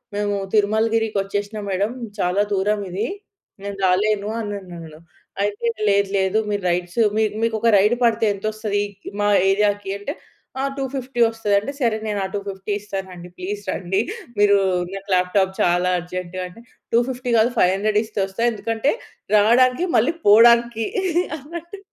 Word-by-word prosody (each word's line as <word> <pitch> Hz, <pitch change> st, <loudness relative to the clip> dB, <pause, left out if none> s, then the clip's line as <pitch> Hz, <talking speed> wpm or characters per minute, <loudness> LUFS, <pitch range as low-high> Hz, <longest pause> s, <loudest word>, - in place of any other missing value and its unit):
"మేము 205 Hz, 0 st, 0 dB, 0.2 s
తిరుమలగిరికి 220 Hz, +1 st, +2 dB
వచ్చేసిన 205 Hz, +2 st, -4 dB
మేడం. 195 Hz, +3 st, 0 dB, 0.3 s
చాలా 180 Hz, +2 st, +1 dB
దూరమిది. 200 Hz, -1 st, -1 dB, 0.6 s
నేను 200 Hz, 0 st, -5 dB
రాలేను." 200 Hz, +3 st, +1 dB
అనన్నాడు. 175 Hz, -7 st, -7 dB, 0.4 s
అయితే 205 Hz, +3 st, -1 dB, 0.2 s
లేదు. 200 Hz, 0 st, +2 dB
లేదు. 190 Hz, +2 st, +2 dB
మీరు 205 Hz, -2 st, -2 dB
రైడ్స్ 175 Hz, +4 st, -2 dB, 0.4 s
మీకు 230 Hz, -1 st, +1 dB
ఒక 235 Hz, -, +2 dB
రైడ్ 210 Hz, +4 st, +4 dB
పడితే 230 Hz, -1 st, +3 dB
ఎంత 200 Hz, +2 st, -9 dB
వస్తది 210 Hz, -2 st, -1 dB, 0.4 s
మా 205 Hz, -, +2 dB, 0.2 s
ఏరియా‌కి? 205 Hz, 0 st, +1 dB
అంటే 275 Hz, +8 st, -4 dB, 0.5 s
ఆహ్, 275 Hz, -, -1 dB
250 265 Hz, -2 st, -4 dB
వస్తది 225 Hz, -2 st, -2 dB
అంటే, 215 Hz, +7 st, -5 dB
సరే 230 Hz, -3 st, +2 dB
నేను 205 Hz, -1 st, -1 dB
ఆ -, -, -1 dB
250 200 Hz, 0 st, -5 dB
ఇస్తానండి. 190 Hz, -3 st, -7 dB
ప్లీజ్ 200 Hz, +3 st, -4 dB
రండి. 190 Hz, +1 st, -1 dB, 0.4 s
మీరు 205 Hz, -1 st, +5 dB, 0.4 s
నాకు 195 Hz, 0 st, -8 dB
లాప్‌టాప్ 190 Hz, +1 st, +1 dB
చాలా 175 Hz, +1 st, +2 dB
అర్జెంట్ 180 Hz, 0 st, -6 dB
అంటే 200 Hz, +6 st, -14 dB, 0.3 s
250 245 Hz, +1 st, 0 dB
కాదు, 225 Hz, +3 st, +3 dB
500 205 Hz, +3 st, +3 dB
ఇస్తే 215 Hz, -1 st, -6 dB
వస్తా, 195 Hz, +4 st, -6 dB
ఎందుకంటే 225 Hz, +4 st, -1 dB, 0.4 s
రావడానికి 250 Hz, -, +4 dB
మళ్ళీ 235 Hz, +8 st, +3 dB
పోవడానికి 235 Hz, +1 st, +6 dB, 0.5 s
అన్నట్టు. 340 Hz, +6 st, -9 dB
205 Hz, 135 wpm, -21 LUFS, 195-225 Hz, 0.6 s, పోవడానికి